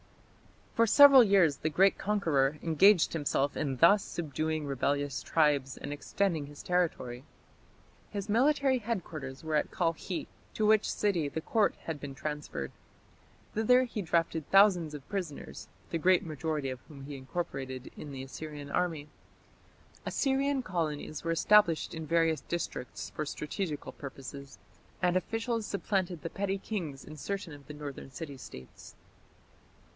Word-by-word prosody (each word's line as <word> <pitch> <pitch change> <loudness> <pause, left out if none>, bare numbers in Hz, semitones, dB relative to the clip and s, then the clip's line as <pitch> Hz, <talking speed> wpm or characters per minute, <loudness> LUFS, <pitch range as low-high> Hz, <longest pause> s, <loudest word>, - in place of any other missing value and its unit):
For 230 0 +3
several 275 +2 +9
years 190 -9 +4
the 155 - -1
great 190 +6 +3
conqueror 160 -9 +1
engaged 175 +3 +5
himself 145 -2 0
in 135 -4 -2
thus 195 +8 +6
subduing 155 -1 -3
rebellious 140 0 -1
tribes 145 -4 +1
and 145 - -5
extending 160 0 -1
his 145 0 -11
territory. 155 -9 -1 0.9
His 200 -1 -4
military 265 +3 +3
headquarters 165 - -5
were 160 -1 -1
at - - 0
Kalkhi, 170 +1 -2 0.3
to 215 - +1
which 215 0 +4
city 175 -8 0
the 160 - -4
Court 215 +5 +2
had 160 -3 -4
been 140 -2 -7
transferred. 150 - -4 0.8
Thither 250 +4 +4
he 230 -4 -4
drafted 165 -3 0
thousands 185 -6 +5
of 140 -2 -10
prisoners, 185 -8 -5 0.2
the 165 - -1
great 180 +2 +4
majority 155 -2 -2
of 130 - -6
whom 140 -4 -11
he 145 +1 -7
incorporated 130 -2 -5
in 150 - -8
the 135 -1 -6
Assyrian 145 +1 -8
army. 165 -4 -1 1.0
Assyrian 275 0 0
colonies 155 -6 -3
were 165 - -1
established 170 -1 +4
in 160 -1 -6
various 165 -3 +2
districts 150 -5 -5
for 155 - -3
strategical 150 +1 -4
purposes, 140 0 -9 0.4
and 180 -1 +2
officials 225 +3 -1
supplanted 190 -5 -1
the 165 - -3
petty 195 0 -1
kings 170 -9 -5
in 155 - -10
certain 190 +1 -4
of 145 -1 -13
the 150 - -7
northern 145 -2 -7
city 140 +1 -7
States. 65 - -12
160 Hz, 140 wpm, -30 LUFS, 145-195 Hz, 1.0 s, several